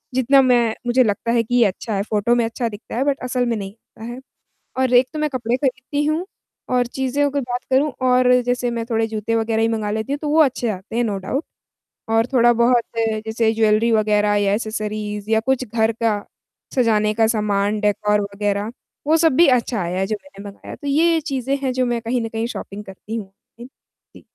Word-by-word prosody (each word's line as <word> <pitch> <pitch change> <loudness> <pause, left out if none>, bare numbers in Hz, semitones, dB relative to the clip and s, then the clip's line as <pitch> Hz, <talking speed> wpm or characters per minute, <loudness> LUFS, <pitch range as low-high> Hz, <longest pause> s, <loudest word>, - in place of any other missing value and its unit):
जितना 270 +2 +5
मैं 240 -3 +3
मुझे 250 +1 +4
लगता 220 +2 -1
है 235 -1 +2
कि 245 +1 +2
अच्छा 205 +2 -2
है 195 - 0
फ़ोटो 215 +3 +1
में 235 -1 +2
अच्छा 230 +1 -2
दिखता 210 +2 -9
है 265 - +2
बट 285 -1 0
असल 250 0 0
में 235 -1 0
नहीं 195 -1 -6
होता 220 0 -17
है। 255 - -8 0.6
और 260 -1 +1
एक 250 +1 +5
तो 310 - -5
मैं 305 -1 0
कपड़े 245 -2 -1
खरीदती 270 +2 -2
हूँ 310 +4 0 0.5
और 245 -1 +2
चीज़ों 265 +3 -1
के 285 0 -1
बात 245 -1 -4
करूँ 275 +3 +2 0.2
और 250 0 +4
जैसे 245 0 -1
मैं 230 -1 -3
थोड़े 225 0 +1
जूते 225 +1 -3
वग़ैरह 225 0 0
ही 225 - +3
मँगा 215 -2 -2
लेती 220 +6 -3
हूँ, 285 - -1
तो 300 - -4
वो 310 +2 +2
अच्छे 255 -4 0
आते 200 +3 -6
हैं 240 - +2
नो 205 -3 -1
डाउट। 270 - -3 0.7
और 225 +1 +3
थोड़ा-बहुत 240 0 +4 0.4
जैसे 220 0 +1
ज्वेलरी 220 +1 +2
वग़ैरह 210 -1 +2
या 200 -1 +2
एक्सेसरीज़ 215 -1 -4
या 220 - +4
कुछ 260 +2 0
घर 220 +1 +1
का 215 -2 +2 0.6
सजाने 215 -4 +2
का 225 0 +3
सामान 210 0 0
डेकोर 210 0 +1
वग़ैरह 205 +1 -2 0.4
वो 320 +1 +4
सब 325 -4 +3
भी 340 +1 +6
अच्छा 230 -4 -3
आया 175 +2 -2
है 190 - 0
जो 215 - -1
मैंने 205 -9 -13
मँगाया। 200 - -10
तो 285 - -8
ये 325 +3 +3
चीज़ें 275 -2 -2
हैं 260 -2 -1
जो 255 0 +1
मैं 240 -1 -1
कहीं 240 +1 -1
न 225 - -3
कहीं 225 +1 -2
शॉपिंग 205 +2 -7
करती 195 +3 -8
हूँ। 195 -4 -6 0.3
इन 240 - -9 0.5
ती - - -14
230 Hz, 215 wpm, -20 LUFS, 215-255 Hz, 0.7 s, भी